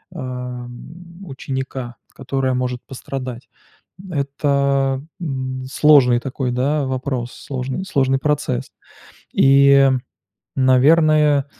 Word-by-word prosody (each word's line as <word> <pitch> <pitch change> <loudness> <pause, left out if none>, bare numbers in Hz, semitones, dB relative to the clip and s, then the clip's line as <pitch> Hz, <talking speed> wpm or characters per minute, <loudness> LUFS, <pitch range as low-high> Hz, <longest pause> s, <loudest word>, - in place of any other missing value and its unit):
э, - - -7
м, 125 +6 -8
ученика, 130 -3 -5 0.2
которое 135 0 -2
может 125 -1 -2
пострадать. 130 -1 -7 0.6
Это, 140 -2 0 0.2
м, 130 -4 -4
сложный 135 -6 +5
такой, 130 0 -3
да, 140 +4 0
вопрос, 130 -2 -3
сложный 135 +6 -5
сложный 135 -8 +1
процесс. 145 - -1 0.6
И, 140 0 +5 0.7
наверное 145 +2 +4
135 Hz, 90 wpm, -20 LUFS, 125-140 Hz, 0.7 s, сложный